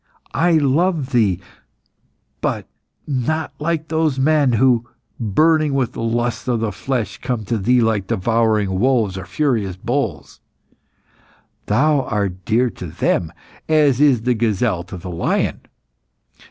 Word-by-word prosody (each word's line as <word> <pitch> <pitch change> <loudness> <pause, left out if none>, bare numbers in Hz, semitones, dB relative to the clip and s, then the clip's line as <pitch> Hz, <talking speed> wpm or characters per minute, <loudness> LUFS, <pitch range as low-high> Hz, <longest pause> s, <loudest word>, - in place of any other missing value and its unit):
I 170 +1 +2
love 155 0 +1
thee, 105 -8 +2 1.0
but - - -2 0.4
not 150 +3 -2
like 160 0 -1
those 160 -3 +1
men 145 -1 +3
who, 120 0 +2 0.3
burning 150 +6 +2
with 130 -4 0
the - - -6
lusts 120 +2 -1
of 120 -2 +1
the 110 -1 -1
flesh, 110 -1 -3
come 125 -4 -3
to 115 +3 -1
thee 120 +5 +3
like 110 -4 0
devouring 105 -2 +1
wolves 115 -5 +2
or 95 0 -7
furious 110 -5 0
bulls. - - -3 1.3
Thou 145 +7 +3
art 100 -7 -3
dear 120 +3 +2
to 90 - -8
them 80 0 -1 0.4
as 145 -4 +3
is 135 -6 +4
the 125 +1 +2
gazelle 110 -4 0
to 95 - -8
the 90 +1 -7
lion. 85 - -1
120 Hz, 135 wpm, -19 LUFS, 105-140 Hz, 1.3 s, is